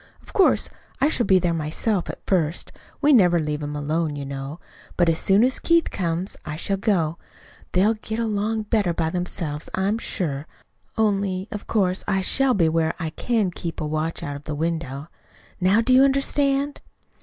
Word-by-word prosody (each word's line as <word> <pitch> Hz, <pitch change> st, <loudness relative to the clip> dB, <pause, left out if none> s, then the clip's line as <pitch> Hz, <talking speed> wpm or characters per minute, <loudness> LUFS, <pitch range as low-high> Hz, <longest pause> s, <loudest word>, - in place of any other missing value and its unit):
Of -, -, -15 dB
course, 385 Hz, -, +4 dB, 0.3 s
I 280 Hz, +2 st, +3 dB
shall 245 Hz, -6 st, 0 dB
be 190 Hz, -, +6 dB
there 175 Hz, -2 st, +1 dB
myself, 165 Hz, +5 st, -1 dB
at -, -, -8 dB
first. 165 Hz, -4 st, 0 dB, 0.3 s
We 295 Hz, 0 st, +5 dB
never 180 Hz, -8 st, +5 dB
leave 150 Hz, -1 st, -2 dB
him 145 Hz, 0 st, -4 dB
alone, 150 Hz, +1 st, -1 dB
you 140 Hz, -1 st, -5 dB
know. 135 Hz, +3 st, -6 dB, 0.4 s
But 175 Hz, -2 st, +4 dB
as 165 Hz, -, +1 dB
soon 200 Hz, +3 st, +4 dB
as 255 Hz, +1 st, +1 dB
Keith 335 Hz, -1 st, +2 dB
comes, 175 Hz, +1 st, -2 dB
I 150 Hz, -, -5 dB
shall 195 Hz, +5 st, -1 dB
go. 175 Hz, -6 st, 0 dB, 0.5 s
They'll 200 Hz, +5 st, +4 dB
get 220 Hz, 0 st, -5 dB
along 220 Hz, -1 st, -1 dB
better 205 Hz, -6 st, +1 dB
by 160 Hz, -1 st, 0 dB
themselves, 165 Hz, -4 st, -3 dB
I'm 200 Hz, +4 st, 0 dB
sure 150 Hz, -8 st, -3 dB, 0.5 s
only, 200 Hz, -3 st, 0 dB
of 210 Hz, -, -6 dB
course, 190 Hz, -4 st, +1 dB
I 195 Hz, -2 st, +1 dB
shall 265 Hz, +7 st, +2 dB
be 170 Hz, -5 st, +3 dB
where 160 Hz, 0 st, +1 dB
I 160 Hz, -2 st, -3 dB
can 215 Hz, +1 st, 0 dB
keep 170 Hz, -1 st, -5 dB
watch 155 Hz, +2 st, -2 dB
out 145 Hz, -, -4 dB
of 145 Hz, +1 st, -10 dB
the 150 Hz, -, -3 dB
window. 155 Hz, -3 st, -3 dB, 0.5 s
Now 190 Hz, +4 st, +4 dB
do 255 Hz, +2 st, +2 dB
you 255 Hz, -, +7 dB
understand?" 275 Hz, +1 st, +1 dB
180 Hz, 180 wpm, -23 LUFS, 160-220 Hz, 0.5 s, you